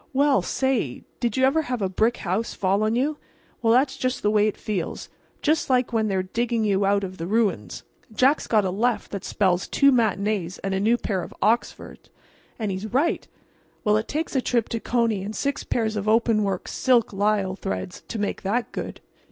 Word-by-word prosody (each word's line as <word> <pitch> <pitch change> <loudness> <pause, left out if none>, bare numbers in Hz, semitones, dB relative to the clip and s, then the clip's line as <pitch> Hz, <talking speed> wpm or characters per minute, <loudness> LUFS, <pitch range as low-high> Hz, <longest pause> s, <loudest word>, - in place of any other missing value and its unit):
"Well, 280 +1 +3
say—did 240 - -2
you 260 - +4
ever 295 +4 +3
have 250 -5 -3
a 195 - 0
brick 220 +6 +1
house 195 +5 -2
fall 195 +2 +1
on 215 +1 +1
you?—well, 265 -4 -2
that's 265 +3 +3
just 255 0 -2
the 210 - +3
way 210 0 +4
it 215 - -2
feels—just 215 - -3
like 250 -1 +2
when 220 -1 +2
they're 190 -2 0
digging 230 +4 -1
you 200 -2 +2
out 200 0 +2
of 185 -2 -6
the 165 - -3
ruins. 195 - 0 0.3
Jack's 265 +7 +2
got 215 -3 +3
a 185 - 0
left 230 +5 0
that 200 - -5
spells 185 -3 +1
two 280 0 +4
matinees 205 -6 0
and 195 0 -1
a 190 - 0
new 225 +4 +3
pair 195 -6 -2
of - - -9
Oxfords—and 220 -1 -3
his 190 +3 -5
right!—well, 255 -6 -2
it 220 - -2
takes 310 0 -3
a 265 - +3
trip 240 -3 0
to 230 - -2
Coney 230 -4 0
and 210 +3 -5
six 280 0 -2
pairs 220 -2 -1
of 210 0 -3
openwork, 215 -4 +2
silk 245 -4 +2
lisle 200 -1 +1
threads 95 - -5
to - - -5
make 205 -1 -2
that 230 +5 -1
good." - - -6
215 Hz, 185 wpm, -24 LUFS, 195-245 Hz, 0.3 s, you